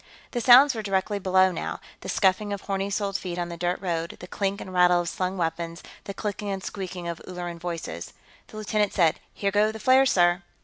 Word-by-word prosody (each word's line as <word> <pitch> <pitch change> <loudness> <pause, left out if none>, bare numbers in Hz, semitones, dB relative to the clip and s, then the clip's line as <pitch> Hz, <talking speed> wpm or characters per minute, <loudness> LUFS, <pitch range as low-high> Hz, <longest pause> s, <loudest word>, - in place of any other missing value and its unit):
The 240 - -2
sounds 255 +4 +8
were 225 - -4
directly 200 0 -1
below, 185 0 +4
now - - -4 0.2
the - - -8
scuffing 205 +1 +2
of 200 -1 -3
horny 195 0 -2
soled 200 -1 -1
feet 180 -2 -5
on 175 -1 -2
the 170 - -6
dirt 175 +1 -1
road, 170 -3 -3
the - - -8
clink 195 +1 -2
and 185 - -8
rattle 180 -1 +5
of 170 - -3
slung 185 +2 -3
weapons, 165 0 -3 0.2
the 200 - -5
clicking 205 -1 -4
and 195 -1 -3
squeeking 185 -3 -6
of 170 -1 -5
Ulleran 175 -2 -6
voices. 165 - -5 0.3
The - - -11
lieutenant 210 -1 0
said, 165 -4 +3
"Here 200 -1 -2
go 210 +2 +3
the 220 - -8
flares, 260 +2 +5
sir." 175 0 +3
190 Hz, 215 wpm, -26 LUFS, 175-205 Hz, 0.3 s, sounds